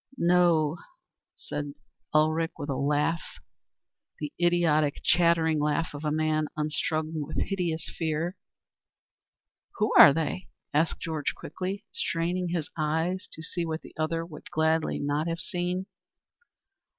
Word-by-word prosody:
"No," 170 Hz, -3 st, +3 dB, 0.6 s
said 145 Hz, -1 st, -5 dB, 0.4 s
Ulrich 155 Hz, +2 st, +2 dB
with 145 Hz, -, -5 dB
a -, -, -1 dB
laugh, 145 Hz, +4 st, +1 dB, 1.0 s
the 150 Hz, -1 st, -5 dB
idiotic 165 Hz, -4 st, +3 dB
chattering 165 Hz, -2 st, +3 dB
laugh 150 Hz, +2 st, 0 dB
of 145 Hz, +1 st, -7 dB
a 150 Hz, -, 0 dB
man 155 Hz, 0 st, +1 dB
unstrung 155 Hz, +1 st, -1 dB
with 150 Hz, +2 st, -5 dB
hideous 175 Hz, -5 st, -1 dB
fear. 165 Hz, +2 st, -1 dB, 1.4 s
"Who 215 Hz, 0 st, +1 dB
are 145 Hz, -, +12 dB
they?" 165 Hz, +5 st, -2 dB, 0.3 s
asked 155 Hz, +3 st, +1 dB
Georg 155 Hz, -3 st, -3 dB
quickly, 190 Hz, +6 st, -5 dB
straining 175 Hz, +2 st, -1 dB
his 170 Hz, -3 st, -2 dB
eyes 160 Hz, +5 st, -1 dB
to 160 Hz, -, -8 dB
see 175 Hz, +1 st, -3 dB
what 160 Hz, -1 st, -3 dB
the -, -, -12 dB
other 165 Hz, +1 st, -1 dB
would 160 Hz, -3 st, -11 dB
gladly 160 Hz, 0 st, +1 dB
not 145 Hz, +3 st, -1 dB
have 165 Hz, 0 st, -1 dB
seen. 180 Hz, +2 st, -2 dB
160 Hz, 125 wpm, -28 LUFS, 155-175 Hz, 1.4 s, are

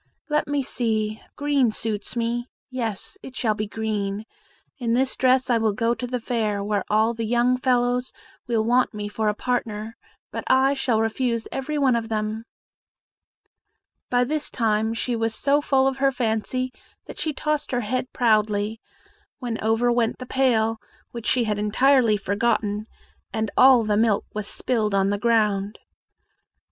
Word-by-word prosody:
Let 300 Hz, 0 st, +1 dB
me 285 Hz, -1 st, 0 dB
see 220 Hz, -3 st, -1 dB
green 285 Hz, -4 st, +2 dB
suits 215 Hz, -1 st, -4 dB
me; 240 Hz, +1 st, -1 dB, 0.2 s
yes, 235 Hz, -, -4 dB
it 260 Hz, -, -10 dB
shall 220 Hz, -4 st, +1 dB
be 215 Hz, 0 st, -3 dB
green. 210 Hz, -1 st, -3 dB, 0.5 s
In 235 Hz, -2 st, 0 dB
this 260 Hz, +1 st, +1 dB
dress 255 Hz, 0 st, +3 dB
I 240 Hz, -2 st, +2 dB
will 220 Hz, -2 st, +1 dB
go 230 Hz, +3 st, +1 dB
to 245 Hz, +1 st, -5 dB
the 250 Hz, 0 st, -2 dB
fair, 220 Hz, -4 st, -1 dB
where 205 Hz, -1 st, 0 dB
all 220 Hz, +2 st, +3 dB
the 230 Hz, 0 st, -4 dB
young 240 Hz, +2 st, +2 dB
fellows 250 Hz, 0 st, +1 dB, 0.4 s
will 230 Hz, -2 st, +1 dB
want 245 Hz, 0 st, +2 dB
me 205 Hz, 0 st, -4 dB
for 215 Hz, +1 st, -2 dB
a 210 Hz, -, -1 dB
partner, 225 Hz, -2 st, -3 dB, 0.4 s
but -, -, -4 dB
I 265 Hz, +1 st, +4 dB
shall 260 Hz, -5 st, +1 dB
refuse 230 Hz, +1 st, -1 dB
every 280 Hz, +3 st, -3 dB
one 265 Hz, -4 st, +3 dB
of 230 Hz, -1 st, -2 dB
them." 215 Hz, +1 st, -2 dB, 1.6 s
By 245 Hz, 0 st, +3 dB
this 300 Hz, +4 st, -2 dB
time 220 Hz, -1 st, 0 dB
she 240 Hz, +1 st, -1 dB
was 225 Hz, -1 st, -1 dB
so 285 Hz, +2 st, +2 dB
full 270 Hz, -2 st, +2 dB
of 270 Hz, 0 st, +1 dB
her 270 Hz, 0 st, +3 dB
fancy 250 Hz, +1 st, -1 dB, 0.3 s
that -, -, -10 dB
she 315 Hz, -, 0 dB
tossed 300 Hz, 0 st, -2 dB
her 245 Hz, -1 st, 0 dB
head 250 Hz, +3 st, -2 dB
proudly, 215 Hz, -2 st, +1 dB, 0.6 s
when 235 Hz, -4 st, -4 dB
over 225 Hz, +2 st, +2 dB
went 235 Hz, -1 st, +1 dB
the 255 Hz, -, -7 dB
pail, 225 Hz, -4 st, +1 dB, 0.3 s
which 235 Hz, -1 st, -6 dB
she 250 Hz, -, +3 dB
had 210 Hz, -2 st, -1 dB
entirely 230 Hz, +1 st, +3 dB
forgotten, 205 Hz, +1 st, 0 dB, 0.4 s
and 220 Hz, -1 st, -2 dB
all 255 Hz, -2 st, +7 dB
the 210 Hz, -1 st, +1 dB
milk 220 Hz, -2 st, +2 dB
was 210 Hz, -1 st, -4 dB
spilled 215 Hz, -5 st, -1 dB
on 195 Hz, 0 st, +2 dB
the 205 Hz, -, -1 dB
ground. 210 Hz, -3 st, +1 dB
230 Hz, 165 wpm, -24 LUFS, 215-255 Hz, 1.6 s, all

